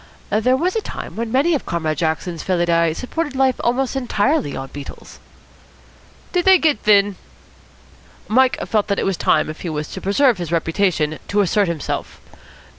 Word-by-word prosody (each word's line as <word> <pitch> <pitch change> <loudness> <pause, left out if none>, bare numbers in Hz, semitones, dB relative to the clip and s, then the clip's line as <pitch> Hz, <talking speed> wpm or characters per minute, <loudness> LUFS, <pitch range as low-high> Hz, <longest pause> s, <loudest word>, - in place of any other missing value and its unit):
"There 235 +5 +2
was 360 +7 0
a 445 - +1
time - - -7
when 230 0 -3
many 280 +7 +3
of 290 - -2
Comrade 160 -3 -2
Jackson's 165 +1 -2
felidae 170 -3 +1
supported 295 - -4
life 260 -1 +1
almost 255 +2 0
entirely 250 - 0
on 135 - -6
beetles." 145 -1 -10 1.1
"Did 355 -1 +1
they 380 0 +7
git 305 -9 +2
thin?" 205 -2 +3 1.1
Mike 255 +3 +3
felt 210 -2 0
that 200 -1 0
it - - -1
was 195 - 0
time, 155 - +2
if 155 - -8
he 175 - -4
was 150 -1 -4
to 190 - -7
preserve 225 +2 +2
his 170 -2 -5
reputation, 165 -2 0
to 205 +1 +2
assert 200 +1 +2
himself. 165 -4 -4
205 Hz, 170 wpm, -20 LUFS, 170-260 Hz, 1.1 s, they